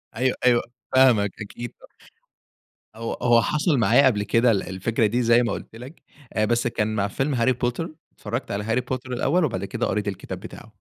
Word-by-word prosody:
أيوه، 130 Hz, +2 st, 0 dB
أيوه 120 Hz, -1 st, +5 dB, 0.3 s
فاهمك. 115 Hz, -7 st, +5 dB
أكيد 120 Hz, +3 st, -7 dB
ط -, -, -20 dB, 1.1 s
هو 115 Hz, 0 st, -4 dB
هو 120 Hz, -1 st, +5 dB
حصل 150 Hz, -, +1 dB
معايا 120 Hz, +4 st, +5 dB
قبل 105 Hz, -5 st, +2 dB
كده 115 Hz, +2 st, +3 dB
ال 100 Hz, -, 0 dB
الفكرة 110 Hz, +4 st, -1 dB
دي 120 Hz, +4 st, +1 dB
زي 120 Hz, +1 st, +4 dB
ما 115 Hz, -, -1 dB
قُلت -, -, -7 dB
لك، 130 Hz, +7 st, -11 dB, 0.3 s
آآ 110 Hz, 0 st, +1 dB
بس 120 Hz, +1 st, +1 dB
كان 110 Hz, -2 st, -1 dB
مع 100 Hz, -1 st, 0 dB
فيلم 135 Hz, +7 st, -2 dB
هاري 125 Hz, +1 st, +2 dB
بوتر، 125 Hz, +7 st, -3 dB, 0.2 s
اتفرّجت -, -, -5 dB
على 100 Hz, +1 st, -2 dB
هاري 115 Hz, +3 st, 0 dB
بوتر 130 Hz, 0 st, -5 dB
الأول 165 Hz, +8 st, +1 dB
وبعد 100 Hz, -7 st, -3 dB
كده 120 Hz, +2 st, -2 dB
قريت 105 Hz, -1 st, -2 dB
الكتاب 95 Hz, -1 st, -5 dB
بتاعه. 110 Hz, -, -11 dB
115 Hz, 195 wpm, -24 LUFS, 105-125 Hz, 1.1 s, أيوه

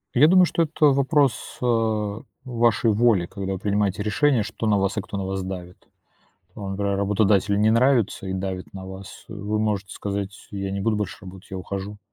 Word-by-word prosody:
Я 140 Hz, +5 st, +7 dB
думаю, 185 Hz, +1 st, +6 dB
что 170 Hz, -, 0 dB
это 155 Hz, -1 st, +3 dB
вопрос, 140 Hz, -2 st, +2 dB
а, 110 Hz, -3 st, 0 dB, 0.2 s
вашей 120 Hz, -2 st, +2 dB
воли, 105 Hz, -4 st, +3 dB
когда 95 Hz, +2 st, -4 dB
вы 95 Hz, -, -3 dB
принимаете 100 Hz, -1 st, 0 dB
решение, 120 Hz, +2 st, +2 dB
что 110 Hz, +1 st, -4 dB
на 105 Hz, -, +3 dB
вас 100 Hz, +1 st, 0 dB
и -, -, +1 dB
кто 100 Hz, -, -7 dB
на 95 Hz, -, -3 dB
вас 95 Hz, 0 st, -3 dB
давит. 90 Hz, -1 st, -8 dB, 0.7 s
А, 100 Hz, -2 st, -5 dB
например, 100 Hz, 0 st, -1 dB
работодателю 100 Hz, 0 st, +2 dB
не 110 Hz, +1 st, +4 dB
нравится 115 Hz, -4 st, +2 dB
и 95 Hz, -, -3 dB
давит 95 Hz, -1 st, -4 dB
на 95 Hz, -1 st, -8 dB
вас. 95 Hz, +1 st, -10 dB
Э, 110 Hz, -, -8 dB
вы 105 Hz, +1 st, -2 dB
можете 105 Hz, -3 st, -1 dB
сказать: 100 Hz, -1 st, -4 dB, 0.2 s
"Э, 100 Hz, -, -6 dB
я 95 Hz, 0 st, -3 dB
не 100 Hz, 0 st, -3 dB
буду 110 Hz, +1 st, +1 dB
больше 105 Hz, -2 st, -3 dB
работать, 95 Hz, 0 st, -12 dB
я 95 Hz, -, -4 dB
ухожу. 100 Hz, +2 st, -6 dB
100 Hz, 205 wpm, -24 LUFS, 95-115 Hz, 0.7 s, Я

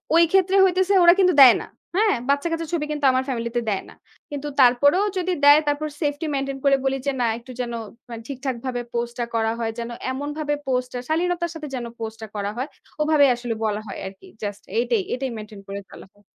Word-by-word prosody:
ওই 335 Hz, -, +7 dB
ক্ষেত্রে 385 Hz, 0 st, +3 dB
হইতেছে 375 Hz, +1 st, +2 dB
ওরা 345 Hz, 0 st, +8 dB
কিন্তু 365 Hz, -1 st, +5 dB
দেয় 255 Hz, -3 st, +10 dB
না, -, -, -9 dB, 0.3 s
হ্যাঁ? 420 Hz, 0 st, +3 dB
বাচ্চাকাচ্চার 325 Hz, +3 st, 0 dB
ছবি 300 Hz, -3 st, 0 dB
কিন্তু 295 Hz, -1 st, -1 dB
আমার 260 Hz, 0 st, +1 dB
family 235 Hz, -2 st, -2 dB
তে 240 Hz, -, +2 dB
দেয় 195 Hz, -2 st, -1 dB
না। -, -, -13 dB, 0.4 s
কিন্তু 290 Hz, 0 st, -4 dB
তারপরেও 285 Hz, +9 st, +5 dB
যদি 365 Hz, 0 st, 0 dB
দেয়, 290 Hz, +1 st, +9 dB
তারপর 290 Hz, +1 st, 0 dB
safety 290 Hz, +1 st, -1 dB
maintain 275 Hz, 0 st, -2 dB
করে 275 Hz, 0 st, +6 dB
বলি 270 Hz, 0 st, +1 dB
যে 280 Hz, -, +3 dB
না -, -, +3 dB
একটু 240 Hz, +2 st, -12 dB
যেন 235 Hz, -1 st, -4 dB, 0.4 s
মানে 230 Hz, -1 st, -7 dB
ঠিকঠাকভাবে 260 Hz, -2 st, -4 dB
post 235 Hz, 0 st, -2 dB
টা 240 Hz, -, 0 dB
করা 225 Hz, 0 st, +1 dB
হয়। 225 Hz, -1 st, -1 dB
যেন 235 Hz, 0 st, -4 dB, 0.2 s
এমনভাবে 295 Hz, +2 st, -3 dB
post 250 Hz, -1 st, 0 dB
টা 245 Hz, -, -3 dB
শালীনতার 345 Hz, +1 st, 0 dB
সাথে 305 Hz, -2 st, -6 dB
যেন 245 Hz, -2 st, -4 dB
post 225 Hz, 0 st, -5 dB
টা 220 Hz, -, -6 dB
করা 200 Hz, 0 st, -2 dB
হয়, 255 Hz, +3 st, -2 dB, 0.3 s
ওভাবেই 300 Hz, -2 st, +4 dB
আসলে 240 Hz, -1 st, -4 dB
বলা 210 Hz, 0 st, -1 dB
হয় 195 Hz, -, -7 dB
আরকি। 190 Hz, 0 st, -12 dB, 0.2 s
Just 205 Hz, -1 st, -5 dB
এইটাই, 235 Hz, -2 st, +2 dB
এইটাই 260 Hz, 0 st, -3 dB
maintain 210 Hz, -1 st, -9 dB
করে 200 Hz, 0 st, -5 dB
চলা -, -, -12 dB
হয়। 205 Hz, 0 st, -27 dB
270 Hz, 210 wpm, -23 LUFS, 235-310 Hz, 0.4 s, দেয়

